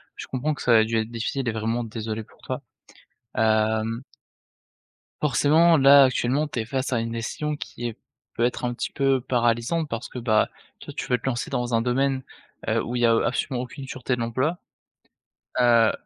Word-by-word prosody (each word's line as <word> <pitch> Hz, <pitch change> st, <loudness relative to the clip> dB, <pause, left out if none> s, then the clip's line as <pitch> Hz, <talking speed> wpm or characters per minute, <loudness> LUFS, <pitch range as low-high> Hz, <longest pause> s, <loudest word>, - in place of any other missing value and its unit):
je -, -, -8 dB
comprends 140 Hz, +4 st, -1 dB
que -, -, -9 dB
ça 120 Hz, -2 st, +5 dB
a 110 Hz, -, +6 dB
dû 115 Hz, +1 st, -2 dB
être 110 Hz, 0 st, -1 dB
difficile, 120 Hz, +2 st, -2 dB
et -, -, 0 dB
vraiment 115 Hz, +2 st, -1 dB
désolé 110 Hz, -1 st, -4 dB
pour -, -, -23 dB
toi, 130 Hz, +2 st, -4 dB, 0.7 s
hem 110 Hz, +1 st, +1 dB, 1.2 s
forcément 155 Hz, +4 st, +4 dB
là, 140 Hz, 0 st, +8 dB
actuellement 130 Hz, +4 st, +1 dB
tu 135 Hz, -, -4 dB
es 110 Hz, -, -2 dB
face 130 Hz, +3 st, -2 dB
à 115 Hz, -, +2 dB
une 115 Hz, 0 st, -3 dB
décision 150 Hz, +6 st, -3 dB
qui 120 Hz, -4 st, -6 dB
est 115 Hz, -, -7 dB, 0.4 s
peut 115 Hz, -, 0 dB
être 125 Hz, 0 st, -1 dB
un 120 Hz, -, -1 dB
petit -, -, -4 dB
peu 135 Hz, -2 st, +2 dB
paralysante 120 Hz, +5 st, +1 dB
parce 115 Hz, -1 st, -5 dB
que -, -, -9 dB
bah, 110 Hz, -3 st, +2 dB, 0.3 s
toi -, -, -9 dB
tu -, -, -2 dB
veux 125 Hz, -, +2 dB
te -, -, -12 dB
lancer 120 Hz, -2 st, -1 dB
dans 125 Hz, -3 st, -1 dB
un 115 Hz, -, +3 dB
domaine, 130 Hz, +2 st, +1 dB, 0.4 s
heu, -, -, +2 dB
où 120 Hz, -, -4 dB
il 120 Hz, -, 0 dB
y -, -, +7 dB
a, 115 Hz, -, +5 dB
absolument 125 Hz, +1 st, -1 dB
aucune 135 Hz, +2 st, -8 dB
sûreté 130 Hz, -1 st, -2 dB
de -, -, -8 dB
l'emploi, 130 Hz, +9 st, 0 dB, 1.0 s
heu, 115 Hz, -2 st, +5 dB
120 Hz, 200 wpm, -25 LUFS, 115-135 Hz, 1.2 s, là